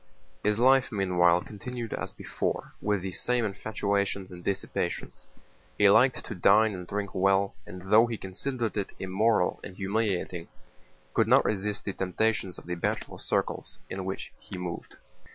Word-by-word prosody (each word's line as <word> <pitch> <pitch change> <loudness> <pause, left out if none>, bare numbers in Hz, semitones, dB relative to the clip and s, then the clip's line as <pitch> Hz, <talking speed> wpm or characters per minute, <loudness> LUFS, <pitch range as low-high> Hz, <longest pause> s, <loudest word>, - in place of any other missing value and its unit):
His 105 0 +2
life 130 +2 +5
meanwhile 90 -4 +3
continued 115 +2 -6
as - - -4
before, - - -3
with 105 -3 0
the 95 - -3
same 120 +5 0
infatuations 100 -2 -1
and 90 -1 -10
dissipations. 100 - -3 0.5
He 100 -1 +6
liked 130 +5 +4
to - - -5
dine 105 +3 +5
and 90 -2 -7
drink 100 0 -3
well, 95 +1 +3
and 90 0 -9
though 110 +2 +7
he 115 -1 -3
considered 115 +5 -3
it 100 - -3
immoral 95 +1 +1
and 90 - -9
humiliating 95 -4 -1 0.7
could - - +3
not - - +5
resist 105 0 -1
the 100 - -2
temptations 95 0 0
of - - -12
the 90 - -3
bachelor 85 - -2
circles - - -2
in 95 0 -3
which 95 +1 -5
he - - -9
moved. 90 -2 -6
100 Hz, 155 wpm, -28 LUFS, 95-110 Hz, 0.7 s, though